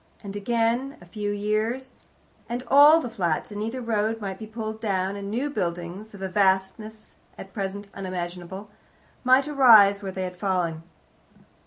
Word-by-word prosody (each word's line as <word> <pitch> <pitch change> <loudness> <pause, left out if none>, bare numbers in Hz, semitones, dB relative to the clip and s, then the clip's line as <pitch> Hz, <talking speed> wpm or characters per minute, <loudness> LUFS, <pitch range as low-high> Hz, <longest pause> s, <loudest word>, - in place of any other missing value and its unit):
And 200 -1 -7
again 235 +5 0
a 175 - -15
few 205 +4 -4
years, 215 +5 -1 0.6
and 240 +1 -3
all 295 +3 +8
the 305 - -4
flats 175 -4 -1
in 205 0 -5
either 230 +4 -3
road 225 -1 -1
might 195 -3 -5
be 220 - -7
pulled 220 0 -6
down, 195 -2 -1
and 200 0 -6
new 245 +7 -1
buildings, 180 +1 -4
of 195 - -9
a - - -1
vastness 195 +3 0 0.2
at 195 0 -10
present 200 0 -4
unimaginable, 185 +1 -6 0.5
might 260 +3 +4
arise 220 -9 +6
where 195 -1 -5
they 190 0 -4
had 180 0 -5
fallen. 175 -4 -1
205 Hz, 160 wpm, -25 LUFS, 190-225 Hz, 0.6 s, all